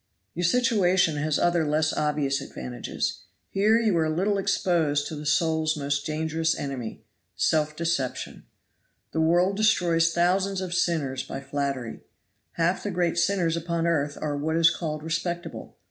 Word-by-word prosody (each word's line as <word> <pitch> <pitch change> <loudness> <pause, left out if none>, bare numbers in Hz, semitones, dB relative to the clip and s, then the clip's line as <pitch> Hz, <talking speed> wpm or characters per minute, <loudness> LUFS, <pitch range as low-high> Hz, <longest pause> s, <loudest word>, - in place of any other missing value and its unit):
"Your 175 +1 -1
situation 190 -7 +3
has 150 0 0
other 175 -1 +2
less 155 +1 +1
obvious 145 -2 0
advantages. 65 -1 -4 0.3
Here 215 +4 +3
you 220 -5 +2
are 160 -1 +1
little 195 +6 +1
exposed 165 -7 +1
to 155 - -5
the 150 0 -6
soul's 160 +1 +1
most 140 0 -2
dangerous 160 +1 -1
enemy 130 -5 -5 0.3
self 155 -1 +1
deception. 160 -6 -3 0.7
The 160 - 0
world 175 +4 +3
destroys 170 -6 +3
thousands 185 +3 +1
of 185 -2 -4
sinners 155 -8 0
by 135 - -6
flattery. 140 -3 -3 0.5
Half 170 +2 +1
the 205 - -3
great 175 -2 0
sinners 175 -3 +1
upon 170 0 -2
earth 145 -4 0
are 150 -1 -2
what 155 +3 -1
is 165 0 +6
called 155 -3 -4
respectable. 170 +2 -4
165 Hz, 145 wpm, -26 LUFS, 150-175 Hz, 0.7 s, is